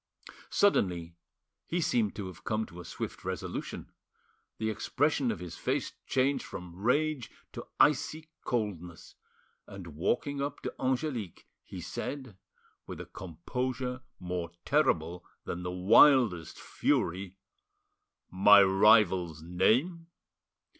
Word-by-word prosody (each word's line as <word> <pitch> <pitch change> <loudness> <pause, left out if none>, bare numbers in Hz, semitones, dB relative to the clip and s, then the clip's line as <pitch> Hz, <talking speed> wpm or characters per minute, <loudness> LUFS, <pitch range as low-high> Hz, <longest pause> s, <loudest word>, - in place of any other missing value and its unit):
Suddenly 90 - +1 0.5
he 175 - -1
seemed 115 - +1
to 100 - -5
have 90 -3 -10
come 110 0 -1
to 90 -3 -12
a - - -12
swift - - -6
resolution: - - -5 0.7
the 110 0 -1
expression 140 +4 0
of - - -4
his 85 -1 -8
face - - -1 0.2
changed 135 +2 +1
from 90 -1 -9
rage 130 - 0 0.2
to - - -8
icy 155 +2 +2
coldness, 90 -8 -4 0.5
and 95 -2 -9
walking 140 - -1
up 140 +1 -3
to - - -4
Angelique, 130 - -2 0.2
he - - -9
said, 130 -7 -6 0.5
with - - -7
a - - -6
composure 125 - -4 0.2
more 90 -2 -4 0.2
terrible 90 - +1 0.2
than 85 - -4
the 90 - -4
wildest 100 - +5
fury— 95 +2 -1 0.9
"My 100 +2 +7
rival's 95 -5 +4
name?" 125 - +1
105 Hz, 115 wpm, -30 LUFS, 90-130 Hz, 0.9 s, My